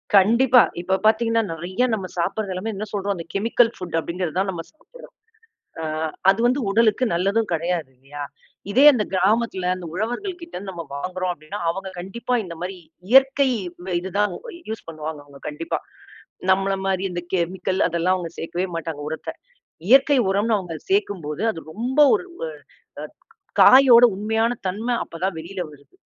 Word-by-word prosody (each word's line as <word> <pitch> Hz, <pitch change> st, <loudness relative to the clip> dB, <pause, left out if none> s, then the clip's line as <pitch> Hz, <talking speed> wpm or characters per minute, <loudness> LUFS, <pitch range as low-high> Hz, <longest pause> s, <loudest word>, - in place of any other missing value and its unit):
கண்டிப்பா. 235 Hz, +6 st, +6 dB, 0.2 s
இப்ப 190 Hz, +2 st, 0 dB
பாத்தீங்கன்னா 230 Hz, +1 st, +3 dB
நெறையா 180 Hz, +9 st, -1 dB
நம்ம 195 Hz, -4 st, -2 dB
சாப்பிடுறது 195 Hz, +4 st, -1 dB
எல்லாமே 215 Hz, +5 st, -4 dB
என்ன 210 Hz, +2 st, -4 dB
சொல்றோம் 200 Hz, 0 st, -1 dB
அந்த 165 Hz, -2 st, -7 dB
கெமிக்கல் 230 Hz, +3 st, +3 dB
ஃபுட் 180 Hz, -3 st, -6 dB
அப்படிங்கறத 170 Hz, 0 st, -4 dB
தான் 195 Hz, -, 0 dB
நம்ம 170 Hz, -2 st, -6 dB
சாப்பிடறோம். -, -, -16 dB, 0.7 s
அ, -, -, -3 dB, 0.5 s
அது 195 Hz, -, 0 dB
வந்து 260 Hz, +3 st, +2 dB
உடலுக்கும் 225 Hz, +2 st, +2 dB
நல்லதும் 200 Hz, +5 st, +1 dB
கிடையாது 165 Hz, -3 st, -1 dB
இல்லையா? 140 Hz, +3 st, -9 dB, 0.5 s
இதே 255 Hz, +8 st, +5 dB
அந்த 230 Hz, -6 st, 0 dB
கிராமத்துல 195 Hz, -1 st, +1 dB
அந்த 180 Hz, -2 st, -8 dB
உழவர்கள்கிட்ட 335 Hz, -, -4 dB
இருந்து 190 Hz, +1 st, -6 dB
நம்ம 170 Hz, -2 st, -6 dB
வாங்குறோம் 185 Hz, +4 st, -2 dB
அப்படின்னா 155 Hz, -1 st, -8 dB
அவங்க 190 Hz, +3 st, -5 dB
கண்டிப்பா 235 Hz, +7 st, -3 dB
இந்த 175 Hz, -2 st, -7 dB
மாதிரி 185 Hz, +2 st, -4 dB, 0.3 s
இயற்கை 270 Hz, +1 st, +5 dB, 0.4 s
ம 185 Hz, -1 st, -3 dB
இது 190 Hz, +2 st, -6 dB
தான் 210 Hz, -2 st, +2 dB, 0.4 s
யூஸ் 220 Hz, 0 st, -6 dB
பண்ணுவாங்க 155 Hz, -1 st, -6 dB
அவங்க 140 Hz, -1 st, -16 dB
கண்டிப்பா. 150 Hz, +2 st, -3 dB, 0.7 s
நம்மள 195 Hz, +1 st, +2 dB
மாரி 190 Hz, 0 st, 0 dB
இந்த 175 Hz, 0 st, -4 dB
கெமிக்கல் 185 Hz, +1 st, -1 dB
அதெல்லாம் 175 Hz, +2 st, +1 dB
அவங்க 170 Hz, -2 st, -5 dB
சேர்க்கவே 175 Hz, +3 st, -2 dB
மாட்டாங்க 160 Hz, -2 st, -5 dB
உரத்த. 160 Hz, -, -5 dB, 0.6 s
இயற்கை 270 Hz, +3 st, +6 dB
உரம்னு 210 Hz, +3 st, +2 dB
அவங்க 175 Hz, -4 st, -6 dB, 0.2 s
சேக்கும்போது 195 Hz, -, -1 dB
அது 165 Hz, -, -8 dB
ரொம்ப 250 Hz, -, -1 dB
ஒரு 380 Hz, -4 st, -1 dB, 0.2 s
ஒ -, -, -4 dB, 0.5 s
அ -, -, -5 dB, 0.6 s
காயோட 255 Hz, -2 st, +8 dB
உண்மையான 220 Hz, +3 st, 0 dB, 0.2 s
தன்ம 205 Hz, +5 st, -4 dB, 0.2 s
அப்ப 165 Hz, -, -11 dB
தான் 190 Hz, -3 st, -1 dB
வெளியில 180 Hz, +4 st, -7 dB
வருது. 140 Hz, -2 st, -19 dB
190 Hz, 160 wpm, -22 LUFS, 170-230 Hz, 0.7 s, காயோட